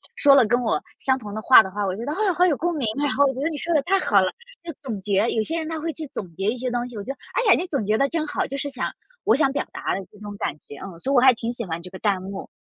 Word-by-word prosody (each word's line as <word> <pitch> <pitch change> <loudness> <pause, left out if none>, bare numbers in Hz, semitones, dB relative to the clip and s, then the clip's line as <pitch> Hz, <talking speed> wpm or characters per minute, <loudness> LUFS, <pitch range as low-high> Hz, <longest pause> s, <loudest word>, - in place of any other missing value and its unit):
说 280 -2 +6
了 260 -4 +6
跟 245 +3 +1
我 230 - +1 0.2
相 260 -1 +1
同 210 -5 -8
的 215 - -4
话 255 0 +8
的 190 - -7
话， 205 +2 -3
我 190 -1 -1
觉 230 - -6
得， 290 - -2
啊， 390 +3 +1
好 360 - +4
有 330 - +3
共 345 +5 -1
鸣。 265 -7 -1 0.2
然 285 - +1
后 285 - +5
我 270 - +1
觉 260 - -5
得 305 - +1
你 310 - -5
说 335 +4 -2
的 300 - +4
太 385 +6 +2
好 200 - +3
了， 185 - +1 0.3
就 340 - -5
总 240 -8 -5
结， 200 +2 +1
有 220 - +1
些 325 +10 -2
人 320 -1 -3
他 320 -1 -4
会 325 +2 -2
去 315 0 -6
总 180 -4 -7
结 195 +3 -3
一 245 - -2
些 255 - -2
东 245 0 -2
西， 245 - -10
我 205 - -5
觉 265 - -4
得， 275 - -9 0.2
哎 475 -5 +3
呀， - - +6
你 360 - -2
总 280 -10 -2
结 215 +2 +1
得 275 - +3
真 320 -2 -2
好， - - -1
就 275 - -6
是 285 - -2
想 265 -2 -3 0.3
我 220 - +4
想 275 -1 +2
表 285 - -2
达 - - -2
的 195 - -5
那 205 - -16
种 205 -1 -8
感 140 - -2
觉。 - - -12
嗯， 180 -4 -10
所 270 - -2
以 280 - +2
我 - - +7
还 260 +1 +7
挺 230 0 -4
喜 235 -2 -3
欢 165 -1 -4
这 180 - -10
个 190 - -9
弹 195 -2 0
幕。 195 +1 -7
250 Hz, 375 characters per minute, -23 LUFS, 205-295 Hz, 0.3 s, 话